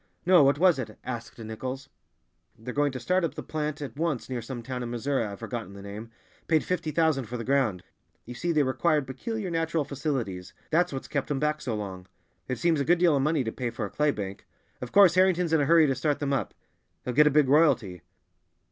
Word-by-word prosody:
"No, 180 -2 +7
what 140 +1 +4
was 175 -3 +4
it?" 110 -4 -6
asked 120 -2 -6
Nichols. 130 +4 -6 0.7
"They're 120 +3 -7
going 145 0 +1
to 130 - -6
start 180 +9 +1
up 165 - -2
the - - -6
plant 150 -1 -3
at 130 -5 -7
once 150 -5 -2
near 125 -2 -2
some 120 +1 -7
town 125 +1 -5
in 120 - -4
Missouri, 120 +2 -1
I've 100 -2 -5
forgotten 115 -3 -6
the 100 - -10
name—paid 115 +9 -4
fifty 175 -3 -2
thousand 155 -4 +1
for 120 +3 -5
the 115 - -5
ground. 120 -9 +1 0.4
You 125 - -8
see, 170 +8 -2
they 155 -3 +3
required 145 +3 +1
peculiar 190 - -4
natural 165 -2 0
facilities; 130 - -3 0.2
that's 175 +3 +2
what's 135 -1 -5
kept 140 - -2
them 145 -3 -1
back 150 +1 0
so 120 -3 -2
long. 95 -3 -6 0.4
It 130 - -2
seems 160 +5 +2
a - - -1
good 175 +5 +4
deal 170 -3 +4
of 135 - +2
money 150 0 +1
to 110 - -3
pay 125 0 -3
for 120 - -4
a - - -8
clay 150 0 +1
bank. 100 -7 -5 0.3
Of 125 -1 -6
course, 195 -4 +7
Harrington's 180 -2 +3
in 160 - +4
a - - +2
hurry 165 +1 +6
to 135 - +2
start 145 +1 0
them 140 -1 -1
up; 135 - -2 0.5
he'll 125 - -2
get 150 +4 +6
a - - +6
big 150 -1 +3
royalty." 125 - +3
140 Hz, 230 wpm, -27 LUFS, 120-160 Hz, 0.7 s, No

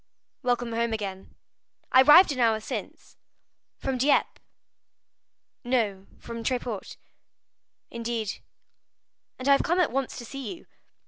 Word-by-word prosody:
"Welcome 245 -2 -1
home 230 0 0
again." 195 -3 -6 0.6
"I 260 - +7
arrived 300 +6 +8
an 265 - -4
hour 225 -2 +3
since." 220 - -7 0.6
"From 265 -2 -3
Dieppe?" 280 +3 +2 1.2
"No, 220 -6 -1
from 230 0 -8
Tréport." 240 -4 -3 0.9
"Indeed?" 230 -2 -3 1.0
"And 255 - -5
I - - +6
have 275 - +5
come 345 +2 0
at 355 - +2
once 270 +1 -2
to 240 - -7
see 275 +8 -6
you." 335 - -17
245 Hz, 125 wpm, -26 LUFS, 225-270 Hz, 1.2 s, arrived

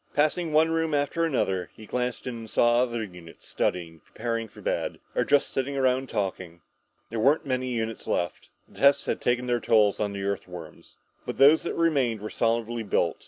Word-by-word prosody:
Passing 155 +3 +1
one 160 +2 +4
room 165 -2 0
after 145 +4 0
another, 95 - -1
he 110 - -12
glanced 125 +2 -3
in 125 -2 -4
and 115 -1 -8
saw 120 +2 +3
other 120 -2 -1
units 90 -5 -12
studying, 85 -2 -2
preparing 115 +3 -4
for - - -16
bed, - - -2 0.2
or - - +2
just 145 0 +2
sitting 140 +1 -2
around 130 0 +1
talking. 95 -4 -3 0.5
There 115 - -2
weren't 140 +8 +3
many 130 -1 -1
units 115 -2 -3
left. 85 -2 -2 0.2
The - - -16
tests 140 0 +5
had - - -2
taken 125 +1 0
a 120 - +2
toll 110 -2 +4
of 105 -1 -1
the 100 0 -4
Earthworms. 90 -5 -6 0.3
But - - -5
those 145 +4 +7
that - - -4
remained 140 -9 +1
were 105 +1 -6
solidly 115 0 0
built. 90 -5 0
120 Hz, 190 wpm, -26 LUFS, 105-140 Hz, 0.5 s, those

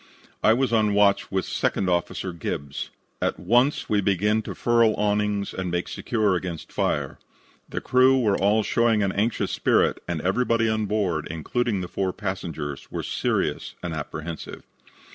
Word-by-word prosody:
"I 110 - +5
was 125 0 +1
on 105 -2 +3
watch 100 -1 +3
with 95 -2 0
Second 95 - -1
Officer 90 +1 -1
Gibbs. 70 -3 -4 0.3
At - - -1
once 125 +5 +2
we 105 -1 +2
began 105 +3 +2
to - - -7
furl 115 -2 +3
awnings 105 -1 0
and 95 -1 -3
make 90 +1 -1
secure 110 -5 0
against 90 -2 -5
fire. - - -1 0.5
The - - -4
crew 130 +1 +4
were 105 -5 +2
all 105 +2 +2
showing 115 -1 +2
an 95 - +1
anxious 110 +5 0
spirit, - - +2
and 85 -2 -2
everybody 115 +4 +1
on 110 -1 0
board, 95 -7 -1
including 100 - -1
the 90 - -4
four 95 0 -2
passengers, 85 -8 -5
were - - -3
serious - - -1
and 85 -2 -3
apprehensive. 80 +1 -6
100 Hz, 160 wpm, -25 LUFS, 90-110 Hz, 0.5 s, I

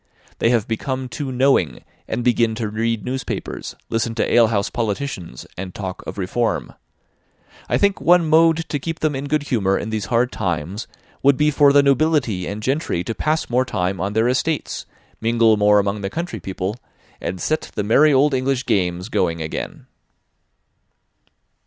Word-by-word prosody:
They 115 - +3
have 115 -3 +2
become 130 +3 -3
too 140 -1 -4
knowing, 125 - +2 0.2
and 120 +2 -2
begin 115 -2 +2
to 110 -1 -2
read 115 0 -1
newspapers, 130 +1 -4
listen 115 0 -1
to 110 - 0
alehouse 110 -4 +3
politicians, 105 - -3
and 90 0 -7
talk 95 -2 -5
of - - -6
reform. 105 +5 -1 1.0
I - - +3
think 200 -1 +1
one 175 -1 +4
mode 165 +1 +4
to 145 - -1
keep 165 +3 -5
them 155 -2 +1
in 135 +1 -4
good 150 0 0
humour 100 -9 +1
in 110 - -4
these 110 -2 -2
hard 120 +2 +1
times 90 +1 -3 0.3
would 140 -1 +4
be 150 0 +3
for 145 0 +5
the 140 0 +5
nobility 140 - +2
and 105 +1 -5
gentry 135 - -1
to 115 - -3
pass 155 +7 -1
more 125 +1 +2
time 90 -6 -2
on 100 +2 -2
their 110 +2 +2
estates, 145 +5 -1 0.3
mingle 115 -1 +4
more 105 0 +4
among 100 +1 0
the 95 - -2
country 170 - -4
people, 95 +3 -4 0.4
and 95 - -4
set 155 - -1
the 105 - -1
merry 140 +9 +5
old 140 +1 +4
English 130 0 0
games 90 -1 0
going 85 -7 0
again." 80 -1 -5
115 Hz, 170 wpm, -21 LUFS, 100-140 Hz, 1.0 s, for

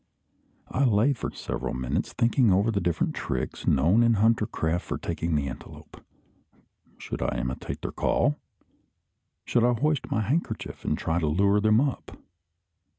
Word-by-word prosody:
I 140 - +1
lay 120 +3 +3
for 125 - -4
several - - -4
minutes, 65 -1 -2
thinking 115 -1 +3
over 100 +5 +3
the 100 -2 -1
different 85 -2 0
tricks - - -4
known 85 - +4
in 115 -1 +4
hunter 110 +1 +3
craft 85 -4 -1
for - - -2
taking 85 -1 -2
the 70 -2 0
antelope. 65 - -10 0.9
Should - - -6
I - - -1
imitate 65 +1 -4
their - - -3
call? 75 - +1 1.1
Should 120 - +2
I 120 0 +4
hoist 150 0 0
my 110 - 0
handkerchief, 140 +11 -3
and - - 0
try 80 +1 -1
to 80 - 0
lure 100 +6 +3
them 110 +1 +4
up? 140 -1 -2
105 Hz, 155 wpm, -26 LUFS, 80-115 Hz, 1.1 s, known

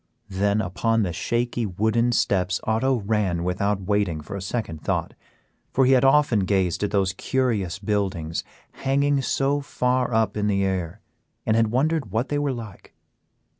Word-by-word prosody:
Then 100 +2 +1
upon 115 +4 0
the 90 -3 -2
shaky 120 +4 -1
wooden 110 +5 +1
steps 95 -5 +1
Otto 115 +3 +1
ran 100 -5 0
without 95 +3 0
waiting 100 -4 0
for 75 +6 -8
a 100 - -5
second 95 -6 -4
thought, - - -1 0.6
for 135 - +3
he 130 - +4
had 130 -1 +5
often 135 -4 +4
gazed 95 -3 +1
at 105 - 0
those 95 -2 +1
curious 105 -6 -1
buildings 95 -5 -2 0.3
hanging 140 +1 +1
so 140 +2 0
far 125 -2 0
up 110 -3 +1
in 105 -1 0
the 100 -1 +1
air, 95 0 -3 0.4
and 110 - +2
had 115 -1 +3
wondered 135 +2 0
what 110 +7 -1
they 145 - 0
were 145 -1 0
like. 115 -6 -9
105 Hz, 165 wpm, -24 LUFS, 95-125 Hz, 0.6 s, had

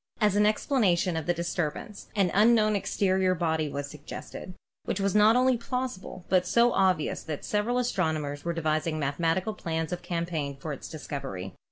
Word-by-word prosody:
As 210 -3 +3
an 210 0 +4
explanation 205 - +2
of 160 0 -3
the 175 - +3
dis 170 0 -3
turbance, 175 +5 -4
an 195 -4 +2
unknown 215 +1 +4
exterior 190 -1 +1
body 160 -2 0
was 145 0 -4
suggested, 150 +5 -9 0.3
which 200 - -2
was 195 -1 +1
not 210 +2 +6
only 255 0 +4
plausible 230 -7 -5
but 180 -1 +2
so 235 +4 +4
obvious 185 -5 +1
that 155 -2 -6
several 210 +4 0
astrono 185 -11 0
mers 145 0 -5
were 170 - -1
devising 155 -1 -1
mathematical 165 +8 0
plans 160 -5 -3
of 175 - -4
campaign 165 -6 -3
for 150 +2 -5
its - - -8
discovery. 100 - -6
180 Hz, 175 wpm, -28 LUFS, 155-210 Hz, 0.3 s, not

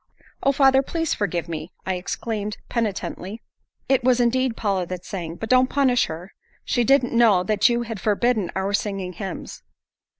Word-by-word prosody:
"Oh, 275 - +3
father, 270 -1 +5
please 325 +3 -1
forgive 175 -5 -2
me," 160 +1 -6
I 190 - 0
exclaimed 210 +3 -4
penitently. 215 -2 -3 0.4
"It 265 -2 +2
was 250 0 +3
indeed 245 0 +1
Paula 195 -5 0
that 180 0 -6
sang. 170 -4 -5
But 220 +5 -6
don't 255 0 +5
punish 260 -4 +3
her. 170 +4 -8 0.3
She 245 - +1
didn't 265 0 +3
know 225 -6 +5
that 210 +3 +3
you 240 0 +1
had 225 -4 -6
forbidden 215 -2 +1
our 190 +1 -1
singing 195 -3 -2
hymns." 190 0 -7
215 Hz, 165 wpm, -23 LUFS, 190-245 Hz, 0.4 s, father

